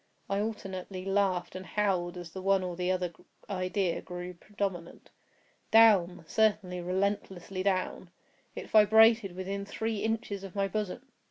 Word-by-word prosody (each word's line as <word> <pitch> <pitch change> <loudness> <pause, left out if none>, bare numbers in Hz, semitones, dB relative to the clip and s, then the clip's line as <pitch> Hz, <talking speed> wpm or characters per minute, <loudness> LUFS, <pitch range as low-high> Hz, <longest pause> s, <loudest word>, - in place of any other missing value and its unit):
I 195 - +1
alternately 190 -3 -5
laughed 195 -3 0
and 185 - -5
howled 185 -4 -1
as 175 -2 -8
the 190 - -7
one 195 0 +2
or 180 -1 -4
the 180 +1 -2
other 180 -2 -1 0.3
idea 185 -1 -1
grew 180 0 -7
predominant. 190 -2 -5 0.6
Down—certainly, 200 -2 +4
relentlessly 190 0 -2
down! 185 -2 -1 0.5
It - - -6
vibrated 220 -2 +6
within 195 +2 -4
three 220 +2 -3
inches 220 -3 -2
of 195 -1 -9
my 195 -1 +1
bosom! 210 +4 -3
195 Hz, 135 wpm, -30 LUFS, 180-205 Hz, 0.6 s, vibrated